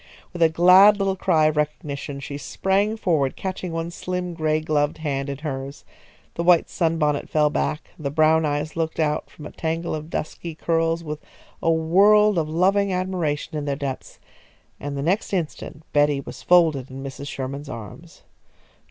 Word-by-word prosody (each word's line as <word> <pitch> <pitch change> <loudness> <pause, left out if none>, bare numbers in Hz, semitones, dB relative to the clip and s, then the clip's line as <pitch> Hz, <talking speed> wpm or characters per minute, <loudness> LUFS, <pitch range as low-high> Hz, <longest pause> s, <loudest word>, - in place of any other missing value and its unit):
With 175 - -6
a 165 - +6
glad 185 +5 +7
little 195 -1 0
cry 165 -4 +2
of 155 0 +1
recognition 145 -1 -3
she 140 +1 -6
sprang 195 +10 0
forward, 155 -10 0
catching 185 -2 -4
one 165 +1 -3
slim 180 0 -4
gray 155 -2 0
gloved 150 -1 0
hand 140 -3 -3
in 140 - -4
hers. 140 -2 -6 0.5
The - - -3
white 175 -1 +4
sunbonnet 160 -4 0
fell 150 -1 +2
back, 150 +2 -2
the 145 -3 -2
brown 155 +2 +3
eyes 150 +1 -2
looked 165 -1 -2
out 150 -1 0
from 150 - -12
a - - -8
tangle 165 +1 -3
of 155 0 -5
dusky 165 0 -5
curls 165 +1 0
with 150 -1 -5 0.4
a - - +1
world 195 +5 +4
of 155 -1 -2
loving 195 +4 +2
admiration 180 -6 -2
in 145 - -5
their 140 -1 -1
depths, 135 -2 -6 0.6
and 145 0 -5
the 140 - -2
next 190 +6 0
instant 160 -3 -4
Betty 145 -1 +3
was 135 - -9
folded 160 -7 +3
in 135 +1 -8
Mrs. 135 +1 -7
Sherman's 140 +2 -5
arms. 155 - -10
155 Hz, 170 wpm, -23 LUFS, 145-175 Hz, 0.6 s, glad